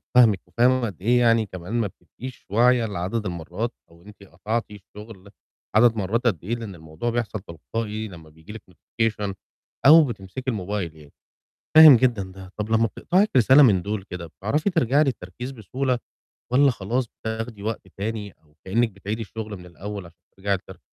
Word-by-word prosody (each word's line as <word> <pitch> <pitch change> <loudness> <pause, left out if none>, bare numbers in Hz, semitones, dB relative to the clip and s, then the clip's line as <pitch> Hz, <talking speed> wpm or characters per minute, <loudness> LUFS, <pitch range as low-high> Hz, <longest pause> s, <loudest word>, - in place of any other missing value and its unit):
فاهمِك، 115 -6 +6
وفاهم 125 +1 +2
قد 95 -5 -7
إيه 120 +5 +3
يعني 115 -2 +4
كمان 90 +1 -8
ما 115 -3 +1
بتبقيش 115 +8 -11
واعية 120 +3 +4
لعدد 105 +2 -3
المرات 90 +6 -4 0.2
أو 85 0 -20
أنتِ 105 0 -15
قطعتِ 105 +6 -3
الشغل 105 0 -12 0.5
عدد 115 +1 +6
مرات 110 +4 0
قد 90 -7 0
إيه، 115 +5 -2
لأن 110 -5 -7
الموضوع 80 +7 -5
بيحصل 115 -2 -2
تلقائي 105 +5 -5
لما 85 -5 -12
بييجي 80 +6 -14
لِك 110 - -9
notification 105 +1 -2 0.5
أو 160 +3 +9
بتمسكي 115 -2 -6
الموبايل 95 -5 -3
يعني، 75 -2 -16 0.6
فاهم 155 -3 +11
جدًا 115 -4 +1
ده، 95 -1 -12
طَب 105 0 -3
لمّا 115 0 +3
بتقطعِك 185 - +1
رسالة 130 +4 +7
من 100 -8 +5
دُول 100 +1 -3
كده، 90 -3 -7
بتعرفي 125 - -1
ترجعي 150 - +3
للتركيز 120 - -4
بسهولة؟ 125 +2 -2 0.5
والَّا 140 +2 +5
خلاص، 120 +4 -2
بتاخدي 110 -1 -6
وقت 110 -3 -4
تاني 105 -1 -4
أو 75 -1 -29
كأنِّك 115 +5 +1
بتعيدي 100 +3 -5
الشغل 110 -1 -6
من 90 - -13
الأول 100 +2 -7
عشان 85 0 -17 0.2
ترجعي 100 0 0
تر - - -12
110 Hz, 170 wpm, -24 LUFS, 95-120 Hz, 0.6 s, فاهم